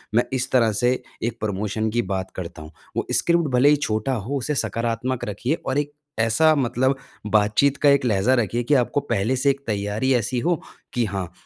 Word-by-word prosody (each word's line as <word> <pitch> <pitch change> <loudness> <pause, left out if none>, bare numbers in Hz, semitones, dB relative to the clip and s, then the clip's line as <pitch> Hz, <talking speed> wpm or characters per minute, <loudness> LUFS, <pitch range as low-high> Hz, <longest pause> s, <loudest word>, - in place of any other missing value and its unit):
मैं 120 - +5
इस 130 +1 -1
तरह 115 -4 +4
से 120 +4 +2 0.3
एक 115 0 -2
प्रमोशन 105 +1 -1
की 120 +2 +1
बात 95 -2 -3
करता 85 -4 -7
हूँ। 75 +1 -10 0.3
वो - - 0
स्क्रिप्ट 170 -2 +2
भले 135 +4 +5
ही 150 - +6
छोटा 110 -2 -1
हो 125 +5 -2
उसे 145 +4 -2
सकारात्मक 120 0 -2
रखिए। 120 +8 -1
और 135 - 0
एक 145 0 -3 0.3
ऐसा 135 +8 +4
मतलब 130 0 +1 0.3
बातचीत 105 +7 +3
का 145 - +4
एक 140 -1 +4
लहज़ा 110 +2 +2
रखिए 120 +1 0
कि 145 +5 +1
आपको 145 - -1
पहले 120 -2 0
से 140 +2 +2
एक 140 0 -6
तैयारी 105 +5 0
ऐसी 120 +2 0
हो 170 +4 0 0.3
कि 120 -1 +1
हाँ, 95 -4 -4
120 Hz, 200 wpm, -23 LUFS, 105-135 Hz, 0.3 s, ही